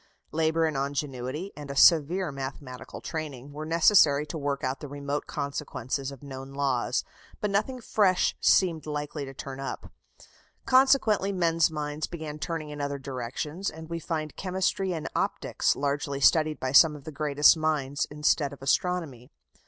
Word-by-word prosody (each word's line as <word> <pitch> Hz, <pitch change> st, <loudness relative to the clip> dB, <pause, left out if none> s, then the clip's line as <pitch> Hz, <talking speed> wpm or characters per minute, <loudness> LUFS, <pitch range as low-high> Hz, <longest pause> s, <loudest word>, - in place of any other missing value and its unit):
Labour 160 Hz, +1 st, +2 dB
and 155 Hz, -2 st, -1 dB
ingenuity, 140 Hz, +4 st, -3 dB
and 145 Hz, -2 st, -9 dB
a 140 Hz, -, -5 dB
severe 165 Hz, +3 st, +5 dB
mathematical 135 Hz, -1 st, -7 dB
training, 145 Hz, -4 st, -6 dB
were 155 Hz, +1 st, -6 dB
necessary 160 Hz, -3 st, +5 dB
to 160 Hz, -, -6 dB
work 140 Hz, -1 st, -2 dB
out 130 Hz, +1 st, -2 dB
the 145 Hz, -, -7 dB
remote 145 Hz, +1 st, -4 dB
consequences 140 Hz, -2 st, -3 dB
of 140 Hz, -1 st, -11 dB
known 135 Hz, -1 st, -8 dB
laws, 130 Hz, -3 st, 0 dB, 0.4 s
but 210 Hz, -, -1 dB
nothing 215 Hz, +6 st, 0 dB
fresh 200 Hz, -5 st, +2 dB
seemed 165 Hz, -5 st, +3 dB
likely 150 Hz, -1 st, -4 dB
to 135 Hz, -, -9 dB
turn 135 Hz, 0 st, -7 dB
up. 135 Hz, -, -6 dB, 0.7 s
Consequently 255 Hz, -7 st, +4 dB
men's 165 Hz, -3 st, +2 dB
minds 150 Hz, -1 st, -3 dB
began 155 Hz, -3 st, -7 dB
turning 160 Hz, -2 st, -4 dB
in 145 Hz, -1 st, -6 dB
other 140 Hz, 0 st, -2 dB
directions, 135 Hz, +7 st, -4 dB
and 160 Hz, +1 st, -11 dB
we 170 Hz, -, -2 dB
find 155 Hz, -3 st, -4 dB
chemistry 190 Hz, 0 st, -1 dB
and 160 Hz, -3 st, -3 dB
optics -, -, 0 dB
largely 140 Hz, 0 st, -2 dB
studied 155 Hz, +1 st, +4 dB
by 130 Hz, -, -2 dB
some 150 Hz, +2 st, +7 dB
of 145 Hz, -, -11 dB
the 155 Hz, -, -7 dB
greatest 145 Hz, +1 st, +4 dB
minds, 150 Hz, -3 st, -1 dB
instead 150 Hz, -1 st, +1 dB
of 140 Hz, -1 st, -11 dB
astronomy. 140 Hz, -5 st, -1 dB
150 Hz, 160 wpm, -27 LUFS, 140-165 Hz, 0.7 s, some